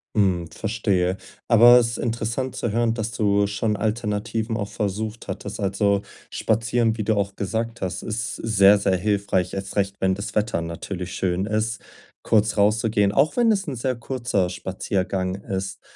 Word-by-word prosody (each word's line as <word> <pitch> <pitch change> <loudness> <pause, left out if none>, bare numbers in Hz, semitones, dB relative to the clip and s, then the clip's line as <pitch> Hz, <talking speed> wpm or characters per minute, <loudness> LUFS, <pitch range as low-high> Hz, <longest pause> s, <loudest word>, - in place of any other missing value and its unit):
Hm. 90 -5 +2
Verstehe, 100 -4 0 0.3
aber 120 +1 +8
es 115 - +1
ist - - -4
interessant 115 +2 -2
zu 120 - -2
hören, 115 +1 +1
dass 115 0 -3
du 100 -2 +2
schon 105 +2 -1
Alternativen 110 +1 -2
auch 100 -2 -3
versucht 110 +2 -3
hattest. 100 +2 -6
Also, 100 0 +1 0.3
spazieren, 115 +1 0
wie 105 - -2
du 110 +1 +1
auch 100 -1 -1
gesagt 115 +3 -3
hast, 90 -2 -3
ist 110 0 -3
sehr, 105 -2 +5
sehr 100 -2 +1
hilfreich, 100 -2 0
erst 95 0 -5
recht, 100 -1 0
wenn 95 0 +2
das 100 +2 -6
Wetter 105 -5 0
natürlich 85 +2 -5
schön 95 0 -1
ist, 110 +1 -1 0.4
kurz 110 -1 +2
rauszugehen, 105 -1 +3
auch 140 +8 +2
wenn 235 -2 +4
es 195 -4 0
'n 140 - -3
sehr 125 +2 -1
kurzer 120 -6 -1
Spaziergang 95 +1 -2
ist. 95 -1 -5
105 Hz, 165 wpm, -23 LUFS, 95-115 Hz, 0.4 s, aber